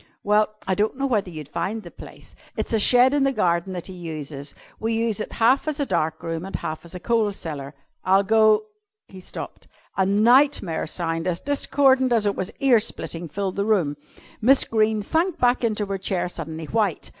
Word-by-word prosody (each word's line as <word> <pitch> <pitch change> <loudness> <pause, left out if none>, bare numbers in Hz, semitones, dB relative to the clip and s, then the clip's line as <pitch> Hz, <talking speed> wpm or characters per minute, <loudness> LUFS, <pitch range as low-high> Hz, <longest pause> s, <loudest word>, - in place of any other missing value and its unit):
"Well, 210 +1 +2
I 190 - 0
don't 210 +6 0
know 275 - -1
whether 215 -8 0
you'd 155 -4 -8
find 215 +8 -3
the 170 - -11
place. - - -13 0.2
It's - - -3
a 225 - +3
shed 250 +5 +5
in 290 -1 +2
the 275 - +3
garden 175 -5 0
that 175 -2 -6
he 190 - -7
uses. 155 -5 -7 0.2
We 225 +1 -1
use 225 -1 0
half 250 +6 +2
as 305 -1 -2
a 285 - +1
dark 160 - -1
room 165 0 -3
and 195 - -7
half 155 0 -4
as 170 - -11
a - - -5
coal 225 +1 +1
cellar." 145 -7 -7 0.3
"I'll 195 +2 +4
go 215 - +4 0.2
" 430 +1 -62
He 190 -1 -11
stopped. - - -8 0.3
A 190 - +2
nightmare 215 - +3
sound, 165 0 -3
as 175 -1 -1
discordant 270 -2 +2
as 225 -3 +2
it 205 - +1
was 185 - -3
ear 265 -4 +5
splitting, 170 -4 -4
filled 190 +4 -4
the 200 - +1
room. 180 -10 +1 0.5
Miss 265 +5 +5
Greene 215 -1 +1
sank 335 - 0
back 245 -2 +2
into 215 -2 0
her 195 -1 -4
chair, 185 -2 -1
suddenly 160 -2 -6
white. 205 0 -1
205 Hz, 200 wpm, -23 LUFS, 170-235 Hz, 0.5 s, shed